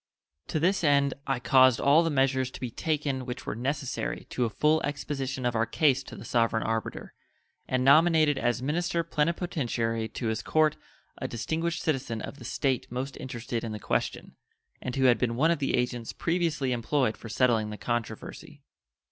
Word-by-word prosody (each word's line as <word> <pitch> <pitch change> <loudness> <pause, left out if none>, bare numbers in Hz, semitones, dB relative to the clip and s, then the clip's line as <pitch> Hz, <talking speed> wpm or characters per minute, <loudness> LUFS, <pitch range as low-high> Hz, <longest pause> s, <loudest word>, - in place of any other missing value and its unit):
To 155 - -1
this 180 +4 +2
end 140 -2 +3
I 135 -2 0
caused 130 -1 +5
all 145 +4 +5
the 165 - +1
measures 135 -2 +1
to - - -10
be 125 -2 -4
taken 145 -2 -1
which 125 0 -6
were - - -2
necessary 135 +3 -3
to 125 - 0
a - - -1
full 155 +8 +2
exposition 135 -3 -3
of 120 -1 0
our 115 +1 +1
case 140 +2 +2
to - - -9
the - - -10
sovereign 115 -2 +1
arbiter, 115 0 -3 0.5
and 130 0 0
nominated 155 0 +5
as 120 0 0
minister 170 +4 0
plenipotentiary 150 -9 -1
to 120 - -6
his 110 - -2
Court 155 -1 +2 0.4
a - - -2
distinguished 165 +8 -2
citizen 130 -7 -1
of 140 - -7
the - - -10
State 135 -4 -1
most 130 +2 -4
interested 120 -3 -4
in 115 -2 -4
the 105 - -5
question, - - -2 0.5
and 125 - -4
who 135 - +1
had 125 -2 +5
been 120 -2 0
one 155 +7 +3
of 170 - 0
the 135 - +1
agents 125 -2 -2
previously 165 -6 0
employed 125 0 +1
for 115 - -10
settling 115 -2 +2
the 105 - -6
controversy. 120 -1 -5
130 Hz, 180 wpm, -28 LUFS, 120-150 Hz, 0.5 s, caused